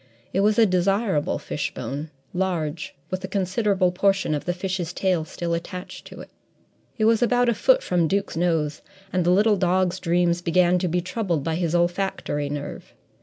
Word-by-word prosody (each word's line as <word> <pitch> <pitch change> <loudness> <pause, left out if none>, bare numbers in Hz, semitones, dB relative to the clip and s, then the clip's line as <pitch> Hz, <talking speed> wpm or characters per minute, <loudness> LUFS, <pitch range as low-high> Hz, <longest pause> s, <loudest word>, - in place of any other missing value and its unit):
It 190 - +1
was 210 +1 +3
a 230 - +6
desirable 190 -3 +1
fishbone, 145 +3 -4 0.2
large, 175 -4 -2 0.2
with 185 0 -3
a - - -3
considerable 190 -1 +1
portion 195 -2 +1
of 145 - -3
the 175 - 0
fish's 180 -2 -3
tail 180 -5 0
still 170 +1 -4
attached 180 +2 -6
to - - -10
it. - - -13 0.7
It 215 - +2
was 225 +1 +4
about 245 0 +3
a - - +3
foot - - +3
from 175 -2 +1
Duke's 200 +2 -1
nose, 160 -3 0 0.3
and 180 -1 +2
the 175 - +2
little 205 +3 +4
dog's 185 0 +1
dreams 175 0 +1
began 180 +1 +3
to 180 - -1
be 175 +1 0
troubled 185 -4 -2
by 165 - -1
his 170 0 -1
olfactory 175 -4 -1
nerve. 145 0 -6
180 Hz, 175 wpm, -24 LUFS, 170-195 Hz, 0.7 s, a